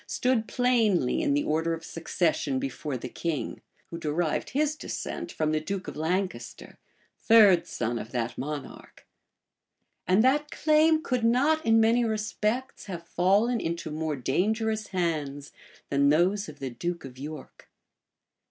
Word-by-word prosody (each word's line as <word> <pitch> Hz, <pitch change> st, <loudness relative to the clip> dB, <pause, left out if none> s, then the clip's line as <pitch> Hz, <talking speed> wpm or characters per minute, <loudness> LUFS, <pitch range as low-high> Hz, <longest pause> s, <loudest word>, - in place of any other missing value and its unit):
stood 250 Hz, -3 st, 0 dB
plainly 225 Hz, -, +2 dB
in 140 Hz, -, +1 dB
the 145 Hz, -, +1 dB
order 160 Hz, +2 st, 0 dB
of 165 Hz, 0 st, -11 dB
succession 160 Hz, -4 st, -1 dB
before 135 Hz, +1 st, -4 dB
the 125 Hz, -, -6 dB
king, 160 Hz, +3 st, -4 dB, 0.3 s
who 170 Hz, -, -5 dB
derived 155 Hz, +1 st, -1 dB
his 300 Hz, +2 st, 0 dB
descent 340 Hz, +2 st, -5 dB
from 155 Hz, -1 st, -1 dB
the 155 Hz, -, +1 dB
duke 190 Hz, +4 st, -5 dB
of -, -, -6 dB
Lancaster, 180 Hz, +4 st, -3 dB, 0.4 s
third 200 Hz, -7 st, +6 dB
son 120 Hz, 0 st, -2 dB
of 110 Hz, -, -8 dB
that 120 Hz, -1 st, -2 dB
monarch; 145 Hz, 0 st, -7 dB, 1.0 s
and 190 Hz, +5 st, +4 dB
that 290 Hz, +3 st, +2 dB
claim 310 Hz, +1 st, +3 dB
could 250 Hz, -7 st, -1 dB
not, 280 Hz, +7 st, +3 dB
in 225 Hz, 0 st, +4 dB
many 230 Hz, +2 st, +4 dB
respects, 215 Hz, +3 st, -2 dB
have 170 Hz, -4 st, -7 dB
fallen 205 Hz, +8 st, +2 dB
into 170 Hz, -3 st, -3 dB
more 155 Hz, 0 st, -2 dB
dangerous 215 Hz, -, 0 dB
hands 150 Hz, -6 st, -2 dB, 0.4 s
man 140 Hz, 0 st, +3 dB
those 185 Hz, +7 st, +2 dB
of 150 Hz, -, -11 dB
the 135 Hz, -3 st, -5 dB
duke 170 Hz, +5 st, -4 dB
of 130 Hz, -1 st, -11 dB
York. 150 Hz, +1 st, -9 dB
175 Hz, 145 wpm, -27 LUFS, 150-225 Hz, 1.0 s, third